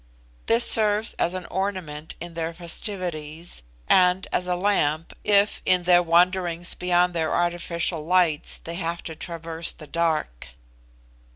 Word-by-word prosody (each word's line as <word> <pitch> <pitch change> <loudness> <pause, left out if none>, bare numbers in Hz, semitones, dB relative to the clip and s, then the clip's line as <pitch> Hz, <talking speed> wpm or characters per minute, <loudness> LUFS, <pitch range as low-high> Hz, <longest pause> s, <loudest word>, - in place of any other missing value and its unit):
This 230 +1 +3
serves 215 0 +1
as 175 +2 +2
an 185 -1 -5
ornament 180 -6 -4
in 170 0 -7
their 165 0 -4
festivities, 170 - -4 0.3
and 180 0 +4
as 180 - +1
a 180 - +1
lamp, 165 -5 0
if, 205 0 +3
in 180 -1 +3
their 175 0 +5
wanderings 175 0 +3
beyond 180 0 +2
their 160 -2 -1
artificial 170 -1 -1
lights, 170 -2 +2
they 165 - -8
have 170 -1 -3
to 160 - -7
traverse 165 0 -5
the 155 - -12
dark. 155 - -1
175 Hz, 135 wpm, -24 LUFS, 165-185 Hz, 0.3 s, their